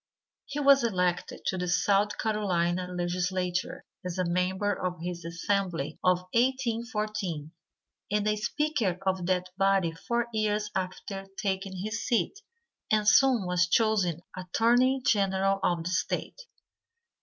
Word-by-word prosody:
He 285 - -4
was 275 -2 +6
elected 180 -5 -1
to 185 - -1
the 180 - -2
South 200 +3 +2
Carolina 185 -5 0
legislature 180 0 -2 0.2
as 180 0 -4
a 185 - +1
member 185 +4 0
of 180 -2 -3
the 175 +2 -3
assembly 170 -1 -2
of 180 -1 +3
1814, 225 - -1 0.6
and 210 +1 +1
as 210 +1 0
speaker 260 - 0
of 185 -2 0
that 185 -1 0
body 195 -3 +3
four 235 +8 -2
years 210 -1 0
after 195 +1 -4
taking 190 -1 -2
his 215 +2 -3
seat 240 - 0 0.5
and 215 -1 +2
soon 255 -4 +5
was 180 -1 +2
chosen 185 -5 +2
Attorney 240 +8 +2
General 195 -1 +2
of 170 -2 +1
the 180 - -3
State. - - -2
195 Hz, 130 wpm, -28 LUFS, 180-215 Hz, 0.6 s, was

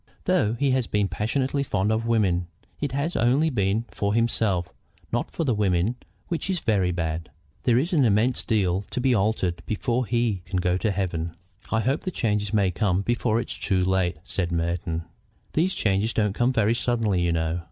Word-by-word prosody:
Though 105 +1 +2
he 140 +2 +1
has 130 -2 +1
been 105 -1 +1
passionately 130 +9 -1
fond 105 -6 0
of 110 +1 0
women, 95 -7 +2 0.3
it 145 - -2
has 140 +6 -1
only 135 +8 +3
been 105 -1 0
for 100 +1 -1
himself, 105 -7 +1 0.4
not - - -1
for - - -3
the 130 -6 +1
women, 100 0 +1 0.3
which 170 +1 -3
is 185 -2 +1
very 100 -8 +1
bad. 80 -2 -3 0.4
There 120 -2 +4
is 165 +9 0
an 150 -5 +4
immense 115 +2 +2
deal 95 -5 +1
to - - -3
be 130 0 +3
altered 95 -5 0
before 120 +2 -1
he 115 -5 0
can 95 - -3
go 90 0 +1
to 110 +4 0
heaven." 85 -4 -2 0.4
"I 110 - +2
hope 135 +5 0
the 185 - -3
change 105 - -1
may 100 -4 +2
come 95 +1 +1
before 120 0 +1
it - - -4
is - - -7
too 95 -2 +1
late," 95 -3 +1
said 90 -2 -2
Merton. 85 0 -1 0.5
"These 180 +5 +1
changes 100 +2 +1
don't 105 -3 +1
come 120 +4 +2
very 110 -3 +2
suddenly, 115 -6 +1
you 85 -1 +1
know. 80 +1 0
105 Hz, 195 wpm, -25 LUFS, 90-120 Hz, 0.5 s, There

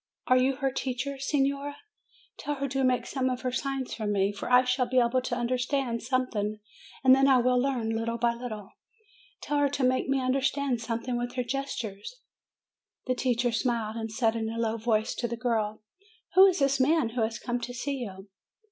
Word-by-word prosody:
Are 255 - +4
you 260 +1 +2
her 270 0 -1
teacher, 265 +1 -3
signora? 280 +1 0 0.6
Tell 295 - -2
her 275 0 -2
to 270 +1 0
make 255 -1 +2
some 260 -1 -1
of 255 0 -3
her 255 - -1
signs 270 0 -3
to 215 -2 -3
me; 200 -1 +1
for 205 - -6
I 250 +1 +7
shall 250 0 +1
be 255 +1 -1
able 250 +1 +3
to 250 -1 -2
understand 250 0 -1
something, 230 -4 -1 0.4
and 260 -1 +8
then 270 +1 +5
I 265 -2 +6
will 250 0 +3
learn 250 -4 -1
little 230 +1 -2
by 235 0 +2
little. 225 -4 -7 0.7
Tell 295 0 0
her 285 -1 +3
to 275 -1 -2
make 255 +1 +2
me 270 0 +2
understand 265 -1 0
something 235 +1 -2
with 245 0 -3
her 250 - 0
gestures." 240 - -4 0.9
The 255 - +1
teacher 245 -1 0
smiled, 230 -2 -1
and 225 -1 -4
said 225 0 +1
in 220 -1 -2
a 225 - -5
low 230 -1 0
voice 220 -1 0
to 240 - -2
the 235 0 -4
girl, 220 -3 -1 0.5
"Who 380 +1 +9
is 375 -1 +2
this 275 -2 +2
man 275 -2 +3
who 235 +1 -3
has 220 +1 -1
come 245 -1 -3
to 245 - -5
see 275 +3 -3
you?" 195 -5 -7
250 Hz, 200 wpm, -28 LUFS, 230-270 Hz, 0.9 s, Who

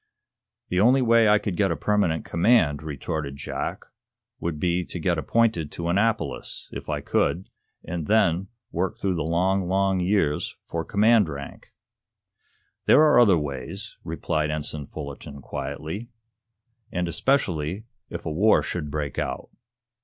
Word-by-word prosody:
"The 90 - +1
only 125 +6 +5
way 115 -2 +5
I 105 - +6
could 100 -3 -3
get 100 +1 +2
a - - 0
permanent 100 -7 +1
command," 85 -5 +3
retorted 75 -1 -4
Jack, - - -4 0.5
"would 85 -3 -3
be 90 +2 +1
to 90 - -6
get 85 0 +1
appointed 90 -2 +1
to 85 0 -3
Annapolis, 110 +5 -1
if - - -7
I - - -1
could, 90 +3 0 0.3
and 85 -3 -4
then 95 -4 +3 0.2
work 90 +3 -1
through 95 -1 0
the 80 -4 -1
long, 90 +4 +1
long 95 0 +2
years 90 -5 0
for 85 -1 -3
command 105 0 +4
rank." 70 -2 -8 1.2
"There - - +7
are 150 -5 +6
other 100 -7 +6
ways," 75 +7 -5
replied 80 -1 -1
Ensign 75 -1 -4
Fullerton, 70 -1 -8
quietly. 95 - -5 0.8
"And 90 -1 -1
especially, 90 - 0 0.3
if - - -7
a - - -2
war 100 +8 +4
should 80 -5 -4
break 75 -2 -3
out. - - -4
90 Hz, 145 wpm, -25 LUFS, 75-105 Hz, 1.2 s, There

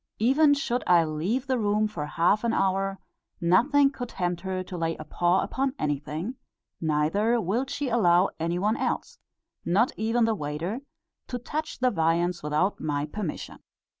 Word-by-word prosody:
Even 285 +6 +4
should 250 -3 -1
I 170 -2 +5
leave 175 - -1
the 260 -2 0
room 210 0 +2
for 155 -8 -5
half 175 +7 +2
an 235 - +1
hour, 195 0 0 0.4
nothing 275 - +4
could 245 -3 -6
tempt 175 -4 -2
her 185 0 -3
to 185 - -8
lay 165 -1 -1
a - - -7
paw 175 +2 +1
upon 270 0 -2
anything; 150 - -3 0.4
neither 165 +10 +1
will 225 +7 0
she 285 +1 -3
allow 190 -6 +4
any 170 +2 -1
one 210 +5 +1
else, - - -3 0.4
not 205 +8 +2
even 225 +2 +2
the 225 - +2
waiter, 165 - -3 0.5
to 250 - -3
touch 305 +6 -4
the 255 0 +2
viands 170 0 +1
without 150 +7 0
my 145 -1 -1
permission. 170 +1 -5
195 Hz, 165 wpm, -26 LUFS, 170-240 Hz, 0.5 s, I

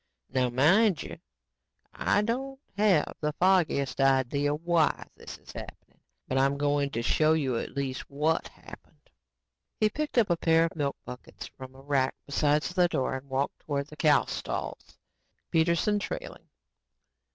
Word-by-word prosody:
Now, 130 -1 +1
mind 165 - +3
you, - - -9 0.7
I 205 - +1
don't 265 +4 -3 0.2
have 200 -7 +3
the 150 -1 -1
foggiest 160 -8 +2
idea 135 +2 +2
WHY 165 0 +1
this - - -10
is - - -14
happening, - - -11 0.3
but 130 - 0
I'm 135 +1 +2
going 145 0 +1
to 115 -3 -3
show 155 +5 +3
you 135 -6 0
at - - -7
least, 135 -2 -4
WHAT 150 +3 0
happened." - - -16 0.7
He 215 - +4
picked 305 -3 -3
up 220 -6 +4
a 170 - +2
pair 165 0 +3
of 165 - -5
milk 140 -3 -2
buckets 125 0 -9
from 130 0 -11
a 135 - -13
rack 135 -2 0
beside 145 +1 +1
the 180 -1 +2
door 135 -6 -1
and 130 +1 -8
walked 135 +2 -2
towards 140 0 -4
the - - -9
cow 150 -3 +4
stalls, - - -5 0.5
Peterson 170 +5 +2
trailing. - - -7
150 Hz, 155 wpm, -28 LUFS, 135-175 Hz, 0.7 s, He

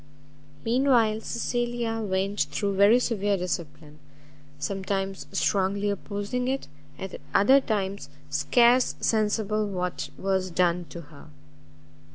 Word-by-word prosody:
Mean 245 +4 +2
while 225 -4 +3
Cecilia 240 -1 -2
went 195 -4 -1
through 200 +7 -1
very 200 +4 +6
severe 205 -5 0
discipline, 155 -4 -5 0.6
sometimes 195 +4 -3
strongly 200 +1 +1
opposing 205 +5 -3
it, 270 +1 -2 0.3
at 190 -1 -7
other 260 +8 +6
times 200 - -2 0.2
scarce 240 - +3
sensible 215 -1 +1
what 180 -2 -3
was 190 -1 0
done 175 0 +1
to 170 - -8
her. 145 -2 -15
200 Hz, 110 wpm, -26 LUFS, 185-225 Hz, 0.6 s, very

